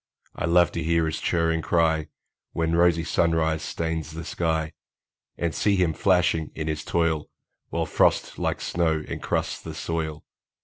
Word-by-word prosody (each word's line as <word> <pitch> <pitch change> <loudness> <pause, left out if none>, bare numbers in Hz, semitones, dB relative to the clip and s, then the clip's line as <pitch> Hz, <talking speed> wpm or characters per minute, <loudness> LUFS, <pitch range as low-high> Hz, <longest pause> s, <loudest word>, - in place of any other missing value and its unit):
I - - -2
love 85 0 +4
to 85 - -3
hear 85 +1 +2
his 80 - -3
chirring 80 -1 +1
cry, 80 -2 +2 0.5
When 80 0 0
rosy 85 -1 +4
sunrise 80 -2 +1
stains 80 -1 -3
the 80 +1 -7
sky, 80 -2 -1 0.6
And 85 -2 -1
see 100 -1 +2
him 90 -4 +2
flashing 90 -4 +2
in 80 - -3
his 80 0 -2
toil, 85 -3 0 0.4
While - - -1
frost - - +1
like - - -1
snow 80 -3 0
encrusts - - -2
the - - -7
soil. 80 -2 -3
80 Hz, 150 wpm, -25 LUFS, 80-85 Hz, 0.6 s, love